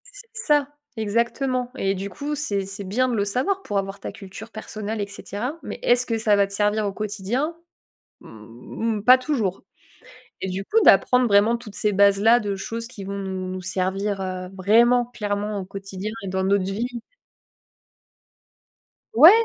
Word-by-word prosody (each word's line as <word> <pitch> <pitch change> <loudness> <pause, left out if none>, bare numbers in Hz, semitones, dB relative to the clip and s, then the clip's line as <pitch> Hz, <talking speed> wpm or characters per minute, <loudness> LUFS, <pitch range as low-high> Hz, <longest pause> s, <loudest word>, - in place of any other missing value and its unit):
C'est - - -13
ça, 295 -3 +2 0.3
exactement, 235 +4 0
et 195 -4 0
du 195 +1 -4
coup, 285 +10 -4
c'est 205 -10 -1
c'est 195 +1 -5
bien 225 +7 +1
de 245 - -1
le 200 -2 +1
savoir 315 - 0
pour 205 - -2
avoir 195 0 -3
ta - - -6
culture 205 +2 -10
personnelle, 215 0 -5
et 200 - -2
cetera, 205 - -5
mais - - -6
est 240 - +5
ce 250 0 -1
que 230 -2 -1
ça 220 -2 +3
va 200 -1 +3
te 200 - -4
servir 210 +1 +1
au 200 - -2
quotidien? 215 - -2 0.7
Mmh, 120 - -5
pas 250 +5 +7
toujours, 245 -9 -2 0.8
et 190 - -2
du 190 +2 -4
coup, 450 - +3
d'apprendre 250 -1 +5
vraiment 210 +3 +4
toutes 220 -4 -11
ces 210 0 +1
bases 200 0 +5
là, 230 +3 +6
de 205 -3 -2
choses 230 +4 -5
qui 230 -5 -10
vont 200 +1 -4
nous 190 -1 -4
nous 185 0 -5
servir, 190 +2 -1
heu, 185 -1 -4
vraiment 235 +6 +4
clairement 210 -3 -3
au 190 - -5
quotidien 195 +1 -6
et - - -5
dans 190 0 -1
notre 195 0 +2
vie 200 +5 -2 2.3
Ouais, 305 +9 +10
205 Hz, 180 wpm, -23 LUFS, 195-240 Hz, 2.3 s, Ouais